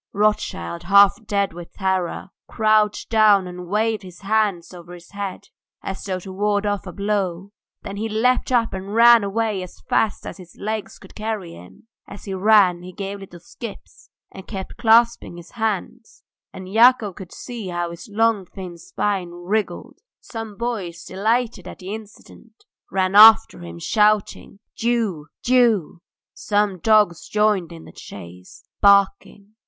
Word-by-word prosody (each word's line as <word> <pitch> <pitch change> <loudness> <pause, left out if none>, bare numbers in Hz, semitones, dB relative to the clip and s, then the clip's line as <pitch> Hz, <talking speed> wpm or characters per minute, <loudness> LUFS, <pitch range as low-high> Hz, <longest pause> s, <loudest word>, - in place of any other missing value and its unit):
Rothschild, 195 - -1
half 200 +4 +5
dead 200 -3 0
with 175 0 -11
terror, 190 -1 -2 0.2
crouched 215 -1 +1
down 210 -4 +5
and 180 0 -8
waved 215 +3 0
his 180 -3 -13
hands 200 -4 0
over 175 0 -11
his 170 -1 -16
head, 200 -2 -6 0.3
as 195 - -6
though 190 -2 -3
to 190 - -9
ward 205 +1 0
off 205 -1 -2
a - - -6
blow; 200 -2 -2 0.3
then 200 - -7
he 220 +2 -3
leapt 250 +5 +1
up 235 -2 +1
and 190 +2 -6
ran 235 -1 +7
away 210 0 -1
as 180 - -10
fast 215 - -1
as - - -7
his 180 -3 -14
legs 215 0 -5
could - - -16
carry 215 -5 -5
him: 90 - -15 0.2
as 200 - -11
he 195 - -5
ran 190 -3 +4
he 180 +1 -10
gave 200 +2 -6
little 185 -3 -12
skips 215 +5 -11 0.2
and 190 - -12
kept 190 -3 -7
clasping 230 -5 +3
his 170 0 -13
hands, 225 +1 -4 0.3
and 190 -1 -10
Yakov 230 -3 +5
could 185 -1 -11
see 235 -5 -8
how 175 -1 -3
his 170 +5 -11
long 225 -1 +1
thin 180 -3 -9
spine 190 +1 -2
wriggled. 175 - -4 0.2
Some 225 -3 -8
boys, 210 -8 -4
delighted 220 0 -1
at - - -9
the 190 +2 -7
incident, 220 +1 -13 0.2
ran 190 0 0
after 220 +2 +7
him 85 -1 -9
shouting 210 - 0
"Jew! 220 -10 -1 0.2
Jew!" 230 -10 +2 0.3
Some 205 -3 -1
dogs 210 -4 +2
joined 210 -5 +1
in 165 -1 -11
the - - -13
chase 90 -1 -12 0.2
barking. 200 +1 +2
200 Hz, 155 wpm, -21 LUFS, 180-220 Hz, 0.3 s, ran